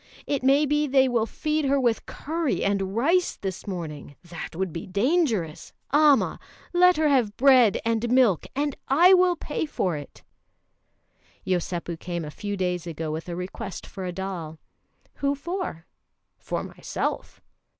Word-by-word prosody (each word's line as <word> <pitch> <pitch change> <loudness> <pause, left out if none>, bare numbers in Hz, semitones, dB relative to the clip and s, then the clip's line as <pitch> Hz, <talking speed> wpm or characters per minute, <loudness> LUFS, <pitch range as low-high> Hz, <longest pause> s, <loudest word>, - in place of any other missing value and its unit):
It 280 -2 -1
may 275 +3 +4
be 295 +1 +1
they 265 -1 +4
will 235 -3 +1
feed 305 +2 -1
her 275 +1 +2
with 240 -3 0
curry 320 0 -2
and 195 -1 0
rice 335 +10 +2
this 190 +1 -6
morning. 155 -7 -6
That 170 -2 -8
would 185 -2 -2
be 165 - -6
dangerous. 210 - 0 0.2
Amma! 295 -2 +4 0.3
Let 360 0 +5
her 310 0 +3
have 245 -8 +2
bread 255 -5 +5
and 230 +1 0
milk, 245 -8 +3
and 285 0 -1
I 345 +8 +6
will 365 -1 +4
pay 305 0 -3
for 185 - -1
it!" 145 -1 -10 1.2
Yosépu 175 -2 -2
came 175 -2 -4
a 150 - -7
few 205 +5 -5
days 180 -2 -2
ago 160 -1 -4
with 160 +3 -5
a 170 - -3
request 185 +2 -6
for 190 - -8
a 180 - -3
doll. 175 -4 -5 0.6
"Who 280 0 0
for?" 340 - -5 0.5
"For - - -3
myself." - - -4
225 Hz, 155 wpm, -25 LUFS, 180-290 Hz, 1.2 s, I